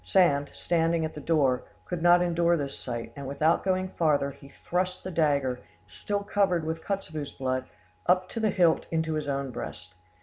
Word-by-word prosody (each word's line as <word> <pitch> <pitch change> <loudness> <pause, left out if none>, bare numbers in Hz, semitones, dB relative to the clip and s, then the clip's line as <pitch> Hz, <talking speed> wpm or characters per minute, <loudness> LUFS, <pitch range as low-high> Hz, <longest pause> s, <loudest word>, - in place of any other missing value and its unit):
Sand, 145 -7 +3
standing 165 -1 +1
at 160 - -5
the 150 - -7
door, 140 -6 +2 0.2
could 175 -2 -4
not 175 +1 +6
endure 170 0 +2
this 140 -2 -3
sight, 120 -2 -5
and 140 -1 -6
without 155 +4 +2
going 185 0 +1
farther, 145 -5 +1
he 140 - -14
thrust 180 +5 -2
the 185 - -5
dagger, 140 -6 +1 0.3
still 200 - -3
covered 190 -5 +1
with 160 0 -3
Kotzebue's 155 -7 -4
blood, 130 -1 -2 0.4
up 185 0 +3
to 230 - -4
the 220 -1 +2
hilt 175 -5 +3
into 160 -1 0
his 155 -1 -2
own 140 -1 -2
breast. 95 -6 -7
160 Hz, 180 wpm, -28 LUFS, 140-180 Hz, 0.4 s, not